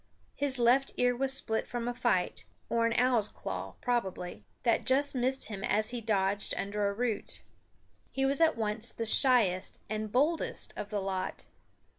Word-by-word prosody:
His 280 -2 0
left 250 +3 +2
ear 245 0 +2
was 265 +2 0
split 225 -4 -1
from 240 -1 -4
a 245 - -2
fight, 240 - -1 0.2
or 230 0 +1
an 230 - -1
owl's 245 -3 +2
claw, - - -7
probably, 190 -7 -3 0.2
that 235 -2 +1
just 275 +2 +2
missed 260 +1 +1
him 195 -3 -6
as 215 +2 0
he 245 -1 -4
dodged 200 -2 0
under 205 +1 -2
a - - -4
root. 235 -1 -3 0.7
He 270 0 -1
was 275 +4 +4
at 320 -7 +3
once 220 +1 0
the 230 - -5
shyest 220 -6 +5
and 215 -1 -4
boldest 300 +7 0
of 205 - -6
the 205 -1 -3
lot. 190 -1 -4
235 Hz, 170 wpm, -30 LUFS, 210-255 Hz, 0.7 s, shyest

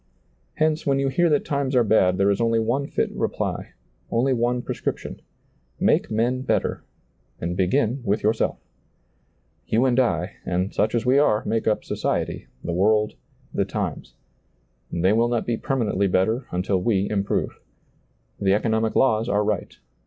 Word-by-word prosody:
Hence, 155 0 +1
when 140 -1 +1
you 135 0 +1
hear 170 +6 +2
that 145 -2 +1
times 140 -2 -1
are 125 - +5
bad 95 -4 +3
there 100 +1 +3
is 100 - 0
only 115 0 +2
one 120 +5 0
fit - - -1
reply, - - -3 0.4
only 130 +3 +2
one 120 0 0
prescrip - - -3
tion - - -9 0.3
— 60 0 -40
make - - +2
men 120 +4 0
better, - - -1 0.6
and 85 +1 -3
begin 115 +7 +1
with 100 -1 0
yourself. 110 +2 +1 1.1
You 115 +4 +2
and 130 -1 +3
I, 90 -8 0
and 90 +2 -1
such 110 +2 +1
as 120 - 0
we 130 +3 +4
are, 110 -5 +2
make 115 0 -1
up 110 - +1
society, - - -2 0.2
the 85 - -3
world, 105 +4 +2 0.4
the - - +1
times. - - -4 0.8
They 90 +4 +2
will 115 +2 +3
not 120 -1 -1
be 120 - 0
per 135 +4 -2
manently 100 -5 0
better 110 +8 +1
until 90 +1 0
we 100 -2 +1
improve. 100 -1 -1 0.8
The 95 -1 +3
economic 110 0 0
laws 115 -3 +3
are 105 +1 +2
right. 105 -2 -2
110 Hz, 165 wpm, -23 LUFS, 100-125 Hz, 1.1 s, are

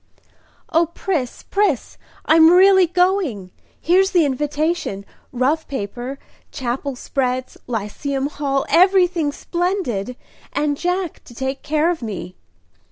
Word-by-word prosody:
"O 330 +1 +3
Pris, 330 -6 -3
Pris, 410 +1 0 0.3
I'm 320 0 +7
really 375 +1 +6
going! 355 - 0 0.3
Here's 375 +3 +3
the 345 -4 +4
invitation 295 - -2 0.3
rough 270 +6 0
paper 250 +1 -5 0.3
Chapel 265 +1 -3
spreads 255 0 -2
Lyceum 250 +5 -3
Hall 280 -2 -1
everything 360 -4 +3
splendid; 340 - -2 0.4
and 295 -1 0
Jack 360 +2 -2
to 240 - -14
take 265 +2 -3
care 310 +3 +1
of 335 - -4
me!" 185 -5 -6
295 Hz, 110 wpm, -20 LUFS, 255-350 Hz, 0.4 s, I'm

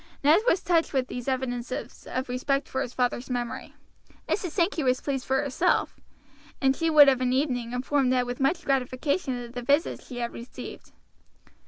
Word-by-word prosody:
Ned 305 +5 +6
was 365 - +3
touched 335 -3 +2
with 260 -2 0
these 245 0 -6
evidences 255 -2 -3
of 255 +1 -2
respect 275 +3 -1
for 265 - -2
his 245 - -3
father's 250 0 -1
memory. 245 -1 -4 0.5
Mrs. 370 -3 -1
Sankey 340 -1 0
was 255 -2 +2
pleased 270 -3 -3
for 265 +2 +2
herself, 290 +6 +1 0.6
and 270 -1 +3
she 330 +2 0
would 300 -2 +8
of 260 -2 +4
an 250 -1 +1
evening 250 -4 0
inform 260 +2 +1
Ned 250 -1 +2
with 245 0 -5
much 320 +6 +1
gratification 265 +1 0
of 235 0 -10
the 245 - -4
visits 285 +6 +1
she 250 - -8
had 235 -1 -3
received. 235 +2 -9
260 Hz, 180 wpm, -27 LUFS, 250-290 Hz, 0.6 s, would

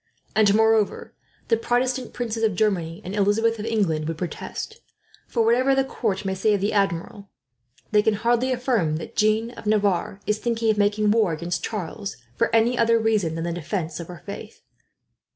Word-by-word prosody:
And 210 -2 +5
moreover, 220 -1 +2 0.4
the 230 - +4
Protestant 250 +2 0
princes 230 -2 -3
of 215 -4 +2
Germany, 175 -5 0
and 190 +3 -4
Elizabeth 215 +3 +2
of 215 - -4
England 170 -9 0
would 165 -1 -3
protest; 440 - -6 0.5
for 230 -2 +1
whatever 255 +4 +3
the 270 - +3
court 210 -7 -2
may 190 - 0
say 205 +3 +2
of 200 - -2
the 205 - 0
Admiral, 195 0 -1 0.6
they 210 -1 +5
can 215 0 +2
hardly 240 +4 +1
affirm 240 - +1
that 160 - -7
Jeanne 215 +2 +2
of 230 - -10
Navarre 200 -2 +1
is 210 0 0
thinking 230 -1 +1
of 210 - -2
making 205 +1 +2
war 215 -6 +3
against 170 +2 -3
Charles 200 -1 -4 0.2
for - - +1
any 230 +2 +3
other 230 0 +4
reason 215 -7 +1
than 165 - -3
the 170 0 -2
defence 170 0 -4
of 170 - -6
her 175 -2 -11
faith. 200 - -9
210 Hz, 185 wpm, -24 LUFS, 190-230 Hz, 0.6 s, And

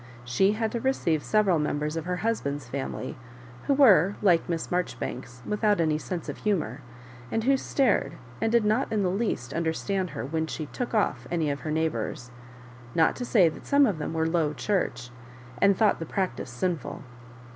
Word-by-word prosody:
She 190 - +3
had 220 0 -1
to 235 - -2
receive 170 - +1
several 205 -6 +3
members 150 +1 -1
of 165 -1 -3
her 180 0 -1
husband's 145 - -1
family, 130 0 -4 0.5
who 280 - +3
were, 205 - +6
like 175 -5 +3
Miss 165 -1 -2
Mar 180 0 +3
joribanks, 125 -7 -7
without 210 -1 +1
any 155 -2 +2
sense 175 0 -5
of 145 - -5
humour, 165 -10 -1 0.5
and 225 - 0
who 270 +3 +4
stared, 255 - +1 0.3
and 225 - +1
did 235 -2 +3
not 220 +6 +1
in 215 -2 +1
the 180 - +1
least 195 - -2
understand 170 +3 -1
her 110 - -3
when 160 +3 -2
she 155 - -4
"took 240 - -4
off" 130 - 0
any 160 -3 0
of 140 - -4
her 155 - -5
neighbours; 150 -6 -2 0.6
not 160 - +4
to 245 - -3
say.that 180 -10 +2
some 285 0 +5
of 200 -10 -1
them 155 +2 -4
were 160 0 +1
Low 160 -2 +1
Church, 125 - -1 0.5
and 200 -1 +5
thought 215 -2 +3
the 165 - -4
practice 190 -7 -2
sinful. 155 +5 -3
170 Hz, 185 wpm, -27 LUFS, 150-210 Hz, 0.6 s, were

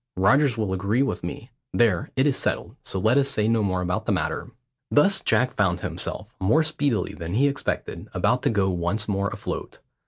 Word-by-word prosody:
Rogers 130 +6 +4
will 105 -4 -1
agree 100 +7 +1
with 135 - -3
me. 110 +8 -6 0.2
There, 105 -8 +2
it 130 - +3
is 145 -3 +2
settled, - - -2
so - - -4
let 110 +8 +4
us 140 0 +1
say 110 -6 0
no 115 0 +2
more 95 -3 0
about 90 0 -2
the - - +2
matter." - - -2 0.4
Thus 190 +7 +4
Jack 125 0 +2
found 90 -5 0
himself, - - -3
more 130 +13 +3
speedily 145 -6 -1
than 85 +2 -5
he 140 +5 +4
expected, 140 0 -3
about - - +1
to - - +1
go 100 -3 +1
once 90 +5 -1
more 100 -1 0
afloat. - - -6
110 Hz, 195 wpm, -24 LUFS, 95-135 Hz, 0.4 s, Rogers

